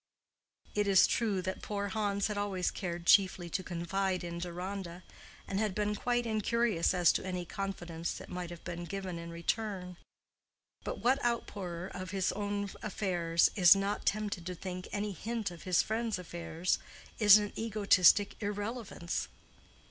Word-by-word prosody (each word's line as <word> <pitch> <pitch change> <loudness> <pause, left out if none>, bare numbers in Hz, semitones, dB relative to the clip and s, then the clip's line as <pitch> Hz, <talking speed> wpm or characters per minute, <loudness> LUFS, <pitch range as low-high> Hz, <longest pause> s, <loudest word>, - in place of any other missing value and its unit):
It 205 -1 +1
is 195 -2 +7
true 210 -6 0
that 190 +1 -3
poor 200 -1 -3
Hans 200 -1 0
had 210 - -1
always 200 -3 -1
cared 175 -2 -4
chiefly 185 -2 +4
to 185 - -1
confide 185 +1 -2
in 170 0 -5
Deronda, 180 +1 -5 0.4
and 195 - -1
had 210 -3 0
been 210 0 0
quite 240 +3 0
incurious 220 -4 +1
as 175 -2 +5
to - - -1
any 180 -2 -3
confidence 175 -4 -4
that - - -9
might 180 -1 -5
have 175 -1 -9
been 175 0 -5
given 185 -1 -5
in 170 0 -7
return; 180 +1 -3 0.9
but - - -4
what 260 +3 +3
outpourer 195 -7 -2
of 185 0 -6
his 190 -1 0
own 205 0 -2
affairs 175 -5 +1
is 180 -2 +8
not 195 +1 -2
tempted 205 -3 0
to 180 - -4
think 180 +1 -6
any 210 0 -2
hint 215 +1 -3
of 170 -2 -11
his 185 -2 +3
friend's 225 -1 -1
affairs 170 -1 -2 0.4
is 210 -2 +9
an 205 -1 -2
egotistic 205 -2 +4
irrelevance? 205 -3 -3
195 Hz, 155 wpm, -32 LUFS, 175-210 Hz, 0.9 s, is